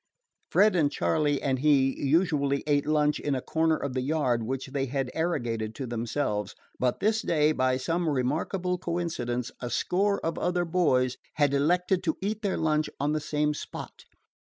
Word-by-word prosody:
Fred 210 -1 +4
and 150 -5 +2
Charley 145 -1 +1
and 130 -2 0
he 135 -2 +3
usually 140 -2 +2
ate 145 -1 +1
lunch 150 -1 +2
in 145 -2 -1
a - - -1
corner 160 +2 +1
of 140 -2 -4
the 130 - -1
yard 130 -4 +1
which 130 +4 -3
they 135 0 -2
had 135 -1 -2
arrogated 120 -10 -2
to 135 - -4
themselves; 115 -3 -2 0.2
but 125 -1 0
this 215 +1 +2
day, 150 -2 +2
by 130 -3 +1
some 165 +5 -1
remarkable 165 +7 -1
coincidence, 165 -9 -2
a 120 - -3
score 200 +9 +1
of 165 - -2
other 180 0 0
boys 130 -8 +2 0.2
had 145 -2 +2
elected 180 +6 +2
to 160 - 0
eat 210 +2 -2
their 200 -3 -1
lunches 155 -1 0
on 145 +2 +1
the 155 - 0
same 150 0 0
spot. - - -8
150 Hz, 175 wpm, -27 LUFS, 130-170 Hz, 0.2 s, Fred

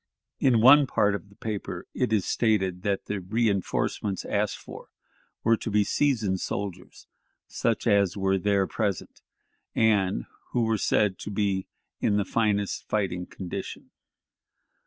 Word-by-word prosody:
In 120 -4 +4
one 140 +4 +8
part 105 -4 +2
of 100 0 -5
the 100 - -20
paper 105 -2 -5
it 125 -3 -1
is 105 -4 +2
stated 95 -6 +1
that 100 0 -1
the 105 - -3
reënforcements 100 -1 -1
asked - - 0
for - - -11 0.6
were 115 0 +4
to - - -5
be 105 0 +3
"seasoned 110 -7 +1
soldiers," 95 -3 -5 0.4
such 115 -2 -1
as 100 -4 +3
were 95 0 +1
there 100 0 +2
present, 100 -2 -3 0.5
and 100 - +2 0.3
who 120 - +2
were 110 -1 +1
said 100 -1 +1
to - - -6
be 100 -2 -1 0.3
in 105 - +2
the 100 - +1
"finest 105 -3 0
fighting 90 -4 -1
condition." 90 -2 -7
100 Hz, 140 wpm, -26 LUFS, 95-110 Hz, 0.6 s, one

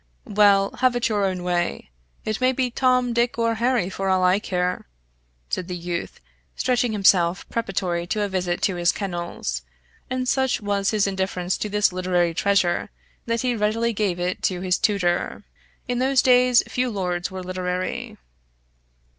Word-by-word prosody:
"Well, 200 -3 +4
have 255 -1 +3
it 245 +1 +1
your 205 -2 +1
own 185 -2 -2
way. 175 - -2 0.3
It 215 +2 -2
may 255 +1 +3
be 255 -1 -1
Tom, 250 -1 +2
Dick, 235 0 +1
or 230 0 +1
Harry 240 -6 +2
for 195 0 -3
all 185 -1 +2
I 180 +2 +4
care," 180 - -2 0.6
said 175 - -2
the 180 - -4
youth, 175 0 -5 0.4
stretching 245 -2 +1
himself 190 -3 +3
preparatory 180 -6 -2
to 210 +3 -1
a - - 0
visit 180 -2 -2
to 190 -3 +1
his 175 0 +3
kennels; 175 - -4 0.5
and 255 0 -2
such 265 0 +1
was 200 -1 0
his 215 -2 +2
indifference 190 -2 -1
to 210 - -2
this 210 -2 +2
literary 180 -2 +1
treasure 190 0 +1 0.4
that 230 0 0
he 250 -1 0
readily 225 +2 0
gave 195 -4 -1
it 180 +1 -2
to 180 -2 -1
his 185 -1 +1
tutor. 180 -4 0 0.4
In 245 0 -1
those 260 0 +3
days, 250 -1 +5
few 250 0 -1
lords 180 -4 -2
were 190 -1 -7
literary. 185 0 -3
195 Hz, 165 wpm, -23 LUFS, 180-235 Hz, 0.6 s, days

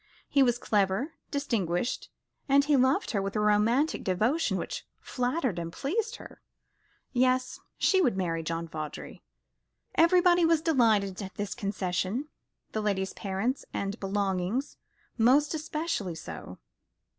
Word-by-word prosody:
He 280 - +3
was 245 -2 +4
clever, 205 - 0 0.2
distinguished, 235 - -1 0.4
and 280 +1 +5
he 295 -1 +3
loved 260 +1 +2
her 200 - 0
with 195 +1 -4
a - - +1
romantic 215 +8 +2
devotion 220 - +1
which - - -4 0.2
flattered 250 - -1
and 170 0 -4
pleased 440 - -2
her. - - -12 0.7
Yes, 255 0 +1 0.2
she 380 -1 +3
would 245 - +2
marry 165 -3 -1
John 165 +1 -3
Vawdrey. 155 -2 -7 0.7
Everybody 350 +1 +5
was 330 -1 +4
delighted 220 - +2
at 190 -1 -7
this 205 -1 -3
concession, 195 +6 -2 0.4
the 215 - -2
lady's 195 -2 -1
parents 200 +7 -2
and 200 +2 -3
belongings 195 +5 -1 0.4
most 275 +7 +4
especially 305 - -3
so. 160 - -8
225 Hz, 130 wpm, -29 LUFS, 190-285 Hz, 0.7 s, and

